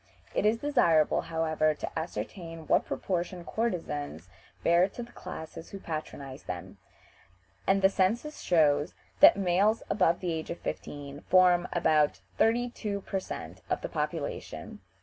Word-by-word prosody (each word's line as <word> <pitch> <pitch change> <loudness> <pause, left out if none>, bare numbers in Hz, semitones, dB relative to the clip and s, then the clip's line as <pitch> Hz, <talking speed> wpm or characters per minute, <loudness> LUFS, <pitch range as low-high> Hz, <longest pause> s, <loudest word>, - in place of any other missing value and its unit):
It - - +2
is 220 +2 +3
desirable, 225 - +3
however, 155 -1 +1
to - - -5
ascertain 165 0 -6
what - - +2
proportion 180 -1 -3
courtesans 150 - -3 0.3
bear 170 +3 +4
to 240 - -7
the 240 - -12
classes 165 -2 -8
who 195 - -7
patronize 145 -5 -6
them, 90 -1 -7 0.9
and 195 0 +3
the - - +9
census 225 +11 0
shows 150 -2 +3 0.2
that - - +9
males 200 +4 +2
above 170 -4 +3
the 175 -3 -2
age 160 -1 -4
of 170 - -3
fifteen 145 0 -6
form 180 -1 +5
about 155 - +3 0.2
thirty 240 +2 +3
two 205 -4 -4
per 195 - -2
cent. - - -7
of - - 0
the - - -4
population. - - -4
175 Hz, 145 wpm, -29 LUFS, 155-195 Hz, 0.9 s, the